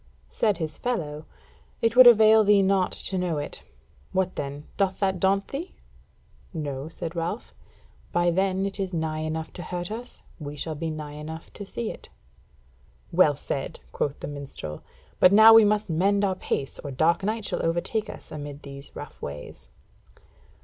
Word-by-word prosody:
Said 210 -3 +1
his 155 -3 -4
fellow: 155 -11 -3 0.5
"It 230 +1 +1
would 255 0 +10
avail 220 -1 +8
thee 205 -1 +5
naught 190 -1 +2
to 190 - -3
know 175 -4 -1
it. 145 0 -5 0.5
What 185 -1 0
then, 140 +1 -5
doth 195 -2 +1
that 190 -2 +1
daunt 195 +1 +2
thee?" 310 +7 -6 0.8
"No," 145 -2 -4
said 165 0 -6
Ralph, 170 +7 -3 0.6
"by 175 0 +2
then 190 +2 +1
it 200 +1 -4
is 190 -1 -2
nigh 160 -1 -1
enough 160 0 -4
to - - -7
hurt 175 +2 -4
us, 240 +3 -7 0.2
we 145 -1 -6
shall 155 +2 -3
be 160 +2 -3
nigh 155 -1 -5
enough 155 +2 -8
to 205 - -7
see 220 +3 -4
it." - - -12 1.0
"Well 160 -4 +5
said!" 135 -1 -4
quoth 145 -1 -2
the - - -5
minstrel; 140 - -7 0.4
"but 185 - +7
now 220 +2 +9
we 225 -1 +9
must 210 0 +2
mend 200 +5 +2
our 190 - +1
pace, 140 -6 -3
or 145 - -6
dark 160 +7 +2
night 215 +1 -1
shall - - -2
overtake 175 +6 -1
us - - -10
amid 145 -1 -7
these 140 0 -10
rough - - -9
ways." 75 +1 -8
175 Hz, 170 wpm, -26 LUFS, 150-200 Hz, 1.0 s, would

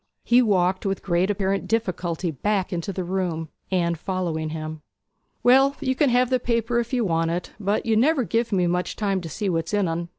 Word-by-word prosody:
He 240 +1 +5
walked 185 -4 +2
with 195 -1 -2
great 180 +1 +1
apparent 195 -1 -1
difficulty 180 -6 -1
back 195 +5 -1
into 175 +3 -3
the 185 -1 -3
room, 175 -3 -2 0.2
Anne 175 -2 +1
following 165 -2 -3
him. 155 0 -6 0.6
'Well, 270 +3 +5
you 260 -2 0
can 280 +1 +2
have 250 +1 +2
the 255 - +3
paper 235 0 0
if 235 0 -3
you 245 -4 +1
want 165 -2 +1
it; 175 +1 -3
but 205 +1 0
you 225 -1 +2
never 270 +4 +3
give 230 +1 -1
me 185 -3 +2
much 180 +1 -1
time 195 -3 -1
to 165 - -7
see 205 +6 -3
what's 165 +1 -1
in 205 -3 +2
en! 170 +1 -3
190 Hz, 205 wpm, -24 LUFS, 170-230 Hz, 0.6 s, He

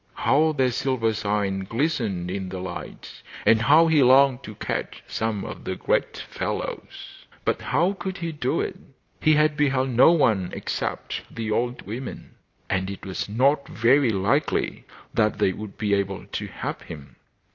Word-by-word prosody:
How 155 +3 +3
their 130 -3 +2
silver 120 -3 0
sides 100 -3 -1
glistened 115 - -1
in 95 -1 -4
the 95 - -5
light, 95 0 -8 0.2
and 110 0 +5
how 150 +8 +6
he 160 -3 +4
longed 130 0 +5
to 110 - -9
catch - - -4
some 110 -3 -2
of - - -8
the - - -3
great - - 0
fellows! - - -6 0.2
But - - 0
how 170 +9 +1
could 190 -1 -5
he 170 -2 -3
do 150 - -1
it? - - -4 0.4
He 155 0 +4
had 150 0 +3
beheld 135 -3 +1
no 125 +7 +6
one 110 - +2
except - - -3
the 110 -2 -4
old 120 +3 -1
women, 120 +6 -7 0.3
and 95 0 -1
it 100 - -7
was 95 +1 -4
not 135 +6 +2
very 125 +3 +3
likely 100 -3 0 0.3
that 105 -2 +2
they 95 - +2
would 105 0 -8
be 105 -2 0
able 100 -1 -1
to - - -5
help - - -5
him. 75 -4 -11
115 Hz, 165 wpm, -24 LUFS, 100-140 Hz, 0.4 s, how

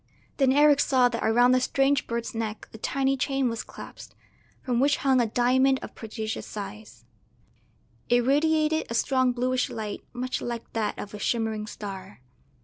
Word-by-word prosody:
Then 270 -2 +4
Eric 290 +1 +5
saw 255 -3 +4
that 230 -1 -4
around 240 +3 +4
the 255 0 +3
strange 275 +1 +1
bird's 235 0 -3
neck 225 -1 -4
a 220 - -10
tiny 270 +3 0
chain 270 -1 0
was 230 -1 -4
clasped, - - -11 0.5
from 245 -2 0
which 285 +3 +3
hung 260 -2 +4
a 235 - +1
diamond 260 +4 +3
of - - -8
prodigious 220 -1 -5
size; 200 - -9 1.0
it 245 0 +3
radiated 310 +3 +2
a 230 - -3
strong 260 0 +2
bluish 250 +1 0
light 215 -2 -5
much 255 +1 -3
like 235 -1 -5
that 215 -2 -1
of 205 - -7
a 210 - -7
shimmering 220 -1 -1
star. 195 - -8
245 Hz, 165 wpm, -26 LUFS, 220-270 Hz, 1.0 s, Eric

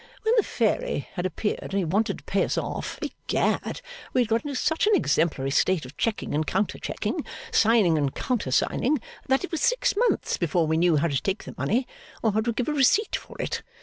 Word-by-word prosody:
When 445 +2 +3
the 455 - +6
fairy - - -1
had 180 -1 -1
appeared 210 +3 -2
and - - -8
he 195 -2 +1
wanted 205 +8 0
to - - -16
pay - - +1
us - - -1
off, - - -3
Egad - - -1 0.3
we 255 - +4
had 240 - +1
got 225 +1 +2
into 285 -2 -4
such 320 +9 +1
an 430 - +5
exemplary 140 - +1
state 175 +1 +2
of 130 +3 -11
checking 225 +5 -1
and 150 +1 0
counter 195 +3 -1
checking, - - -3 0.3
signing 210 - +4
and 140 -2 0
counter 245 - -1
signing, 255 - +1 0.3
that 265 +4 +2
it 365 - -5
was 330 - -2
six - - +2
months 475 +4 +1
before 170 -1 +1
we 160 0 +1
knew 170 -1 +4
how 150 - +2
to 140 -4 -1
take 195 +1 -2
the - - -8
money, 245 +4 0 0.4
or 220 - +3
how 215 +2 +1
to 235 +2 0
give 240 +1 -2
a 305 - 0
receipt 300 - +3
for - - -8
it. - - -2
220 Hz, 220 wpm, -26 LUFS, -, 0.4 s, the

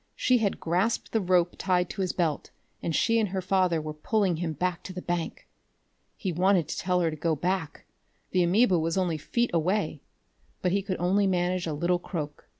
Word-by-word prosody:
She 255 -1 +3
had 205 -3 0
grasped 180 +8 0
the 225 - +1
rope 180 -2 +2
tied 180 -2 +1
to - - -4
his 185 - 0
belt, 160 -5 -1 0.3
and 165 - -2
she 230 0 +3
and 215 -3 +1
her 190 +1 -2
father 185 -2 +2
were 155 0 -5
pulling 185 +2 0
him 165 -1 -2
back 180 +3 -2
to 185 - -6
the 180 - -5
bank! 175 -1 -3 0.7
He 190 - -2
wanted 180 -1 +2
to - - -3
tell 180 0 +1
her 165 -2 +1
to - - -5
go 160 +1 0
back 180 0 -2 0.5
the 185 - +3
amoeba 185 +1 +4
was 165 +3 -1
only 175 -4 0
feet 235 +10 0
away 180 +6 0 0.6
but 180 - +2
he 200 +2 +2
could 190 -1 -3
only 195 +3 +2
manage 180 -1 0
a 160 - -2
little 175 +4 +1
croak. 150 -5 -6
180 Hz, 205 wpm, -27 LUFS, 165-190 Hz, 0.7 s, amoeba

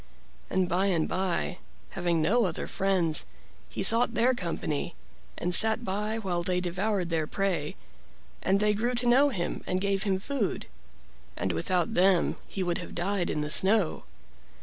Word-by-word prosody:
And 185 -1 +1
by 185 +3 +1
and 170 -5 +1
by, 185 0 -2 0.3
having 170 -3 0
no 225 +8 +3
other 175 -3 -3
friends, 180 -5 0 0.4
he - - -3
sought 230 +5 +4
their 245 +3 +3
company, 170 - -3 0.4
and 180 +1 -2
sat 220 +5 +5
by 210 +3 -2
while 185 -5 -2
they 180 +1 0
devoured 180 0 -1
their 160 -2 0
prey, 180 -7 -2 0.7
and 195 +1 +2
they 210 0 +2
grew 240 +4 -1
to 245 +1 -1
know 265 +4 +5
him 180 -10 -4
and 185 - 0
gave 195 0 0
him 195 -2 0
food. 245 -2 -2 0.7
And 95 - -1
without 165 - -1
them 185 0 +3
he 195 - -3
would 175 -1 -1
have 170 - -8
died 180 +1 -1
in 150 - -1
the 150 0 -2
snow. 195 +1 +2
190 Hz, 165 wpm, -28 LUFS, 175-210 Hz, 0.7 s, sat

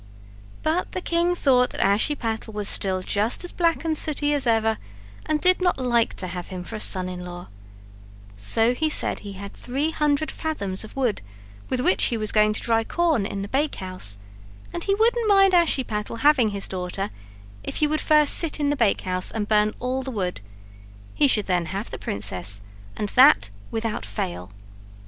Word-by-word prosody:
But 320 +4 -1
the - - -2
king 345 +1 +1
thought 250 -6 +3
that - - -8
Ashiepattle 220 +1 -1
was 210 -1 +2
just 200 - -1
as 355 - -5
black 335 -1 0
and 320 -1 0
sooty 295 -1 +1
as 280 -3 -1
ever, 225 -1 +2 0.5
and 310 -1 +1
did 365 +3 +4
not 360 -1 +2
like 240 -3 +1
to - - -4
have 180 -1 -6
him 185 -2 -7
for 220 - -8
a - - -5
son 185 -3 +3
in 180 -1 -6
law; 175 0 -9 0.9
so 225 - +3
he 310 +5 0
said - - +1
he 200 -1 -9
had 200 +1 -9
three 275 +6 -2
hundred 300 -1 0
fathoms 200 -13 -3
of 215 - -12
wood 255 -6 -1 0.5
with 255 - -1
which 365 +8 +3
he 235 - 0
was 215 -1 -2
going 215 0 +3
to - - -2
dry 225 -1 +2
corn 315 - 0
in 195 -1 -5
the - - -5
bakehouse, 185 - -2 0.6
and 345 - -5
he 395 - +2
wouldn't 455 +1 +2
mind 390 -1 +5
Ashiepattle 240 -10 0
having 285 -6 +4
his 200 -1 -3
daughter 185 +2 -4 0.5
if - - -5
he 305 - +2
would 305 +1 0
first 300 -1 +5
sit 325 -2 +2
in 290 -1 +1
the - - 0
bakehouse 190 -6 0
and 215 -2 -3
burn 210 0 +2
all 255 +1 -2
the 265 - -6
wood; 185 - -3 0.7
he 290 - +3
should 215 -6 +2
then 175 -3 0
have 195 +6 -5
the - - -6
princess, 100 0 -3 0.3
and 210 - -2
that 100 - +5 0.2
without 225 - -3
fail. 90 -3 -5
225 Hz, 185 wpm, -23 LUFS, 195-300 Hz, 0.9 s, mind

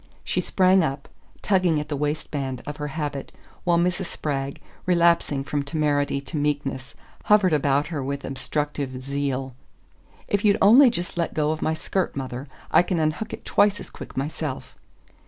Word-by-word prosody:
She - - 0
sprang 190 0 +4
up, 140 -3 -2 0.4
tugging 185 -6 +3
at 150 - -4
the 150 - -2
waistband 145 -3 -3
of 145 0 -6
her 150 - -3
habit, 145 -1 -4 0.3
while 175 -1 +3
Mrs. 180 +2 0
Spragg, 140 -2 -3 0.3
relapsing 170 -5 +3
from 145 +1 -1
temerity 145 -1 0
to 145 +3 -5
meekness, 140 -3 -2 0.3
hovered 205 -5 +5
about 145 0 +2
her 150 -5 -3
with 140 +1 -4
obstructive 140 -1 -3
zeal. 135 -1 -2 0.7
"If 205 0 0
you'd 205 -1 +4
only 245 +7 +8
just 175 -5 -4
let 170 - -1
go 150 0 +2
of 155 - -3
my 160 - +1
skirt, 185 +3 -2
mother 130 0 -5 0.2
I - - +7
can 180 -1 -1
unhook 155 +7 -1
it - - -8
twice 205 0 +3
as - - -10
quick - - -10
myself." 135 - -4
150 Hz, 165 wpm, -24 LUFS, 140-175 Hz, 0.7 s, only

